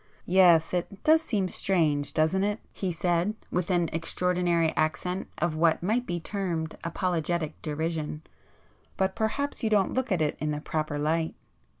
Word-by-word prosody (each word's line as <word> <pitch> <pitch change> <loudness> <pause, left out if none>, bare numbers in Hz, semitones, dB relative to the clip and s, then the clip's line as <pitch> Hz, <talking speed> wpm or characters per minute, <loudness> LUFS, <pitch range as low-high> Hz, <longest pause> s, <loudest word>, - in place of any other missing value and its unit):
"Yes,—it 180 +1 +3
does 315 +1 +5
seem 210 - 0
strange,—doesn't 160 0 +1
it?"—he 205 -2 -3
said 175 +4 0 0.2
with 180 0 -1
an 175 -2 +2
extraordinary 170 0 +1
accent 180 +4 -1
of 170 -2 0
what 165 +1 +2
might 230 +6 0
be 175 0 -2
termed 170 -3 -3
apologetic 170 -2 -2
derision—"But 160 +4 -5
perhaps 275 +7 -1
you 225 - +1
don't 205 -3 +2
look 260 -2 -1
at 185 - +2
it 150 - -1
in 155 - -1
the 150 0 -2
proper 155 -1 -2
light. 160 +2 0
175 Hz, 135 wpm, -27 LUFS, 160-190 Hz, 0.2 s, does